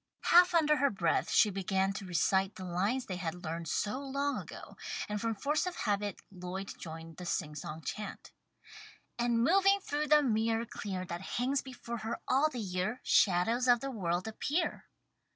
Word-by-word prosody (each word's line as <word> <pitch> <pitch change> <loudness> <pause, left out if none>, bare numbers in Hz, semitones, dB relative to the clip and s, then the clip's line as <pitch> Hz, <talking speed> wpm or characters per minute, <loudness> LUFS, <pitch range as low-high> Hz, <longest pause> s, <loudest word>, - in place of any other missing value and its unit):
Half 355 0 +6
under 300 -2 +4
her 280 -1 +3
breath 175 -5 0
she 210 - +5
began 195 0 0
to 195 -1 -6
recite 190 +2 +1
the 190 - -8
lines 200 +9 0
they 185 - -4
had 175 0 -4
learned 165 0 -4
so 210 - -1
long 280 +1 -1
ago, - - -10 0.3
and 210 -1 -3
from 230 -1 -1
force 295 - 0
of 360 - -3
habit 205 -2 -2
Lloyd 185 +1 -6
joined 165 0 -8
the 180 - -7
sing 155 -3 -1
song 150 +2 -7
chant: 210 -1 -6 0.9
"And 235 -1 +2
moving 390 +6 +5
through 300 -5 -2
the 300 0 +6
mirror 225 -1 +1
clear 190 -5 -5
That 170 0 -5 0.2
hangs 260 +3 +1
before 245 -2 -7
her 225 +2 -4
all 275 +4 +3
the 255 - -6
year, 190 +3 -2
Shadows 225 +7 +3
of 245 -1 +6
the 275 +2 -4
world 180 -4 -1
appear." 285 +9 -2
215 Hz, 175 wpm, -32 LUFS, 185-265 Hz, 0.9 s, Half